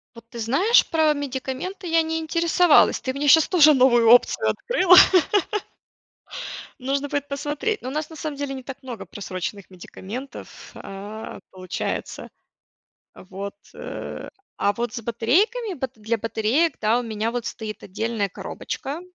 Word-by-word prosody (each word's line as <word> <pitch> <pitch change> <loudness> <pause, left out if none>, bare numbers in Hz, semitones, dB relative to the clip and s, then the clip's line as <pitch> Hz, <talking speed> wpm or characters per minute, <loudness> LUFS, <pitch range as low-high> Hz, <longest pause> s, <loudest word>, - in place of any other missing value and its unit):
Вот 230 0 -14
ты 235 - -10
знаешь, 330 - +3
про 315 -2 +3
медикаменты 285 +7 -5
я 330 0 +3
не 320 0 -2
интересовалась, 335 +1 +3
ты 260 - -3
мне 290 +1 -1
щас 315 +2 +6
тоже 310 -4 +6
новую 240 -4 +5
опцию 245 - +5
открыла. 370 -7 +4 1.8
Нужно 275 +2 -2
будет 285 0 -3
посмотреть. 295 +10 -3
Ну, 255 - -5
у - - -5
нас 305 +2 -3
на 320 - -10
самом 305 -1 -5
деле 280 -1 -4
не 260 - -7
так 270 +2 -9
много 250 -3 -8
просроченных 195 0 -6
медикаментов, 205 +8 -9
а, 205 +3 -8
получается. 185 -1 -5 0.9
А, - - -14
вот, 195 +2 -7 0.2
э, - - -7 0.3
а 200 - +1
вот 235 +2 -3
с 240 - -5
батарейками, 355 - +1
бат 265 -5 -5
для 220 +1 -2
батареек, 230 +8 0
да, 220 +3 +2
у - - -4
меня 220 0 -2
вот 240 -1 -4
стоит 215 -2 -6
отдельная 210 +1 -2
коробочка, 280 - -6
260 Hz, 150 wpm, -23 LUFS, 225-310 Hz, 1.8 s, щас